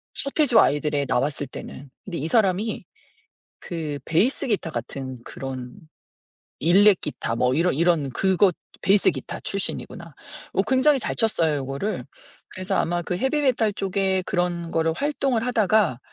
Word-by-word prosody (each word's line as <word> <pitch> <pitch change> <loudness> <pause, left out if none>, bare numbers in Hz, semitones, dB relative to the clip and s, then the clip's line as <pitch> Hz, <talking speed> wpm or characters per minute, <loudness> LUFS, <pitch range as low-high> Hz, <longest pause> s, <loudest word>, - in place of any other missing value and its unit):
서태지와 280 -5 +4
아이들에 145 -1 0
나왔을 145 +4 0
때는. 140 +1 -9 0.2
근데 175 -4 -5
이 155 - -2
사람이 210 +1 +1 0.7
그 155 -4 -5
베이스 225 - +1
기타 205 -7 -1
같은 130 +1 -6
그런 130 -2 -7 0.9
일렉 195 +4 +5
기타 115 -6 -4
뭐 125 +2 +2
이런 170 +1 +2
이런 165 -3 +2
그 190 +8 +1
것 185 -1 +4 0.3
베이스 195 +3 +4
기타 - - -7
출신이구나. - - -5 0.4
어 - - +2
굉장히 265 +2 +3
잘 - - -2
쳤어요 165 -9 +2
요거를. 140 +9 -3 0.4
그래서 185 0 -3
아마 175 +1 0
그 175 - -3
헤비메탈 260 -2 +1
쪽에 190 -1 0
그런 175 -2 -1
거를 165 0 +1
활동을 270 - -1
하다가 215 - +2
180 Hz, 310 characters per minute, -24 LUFS, 150-215 Hz, 0.9 s, 일렉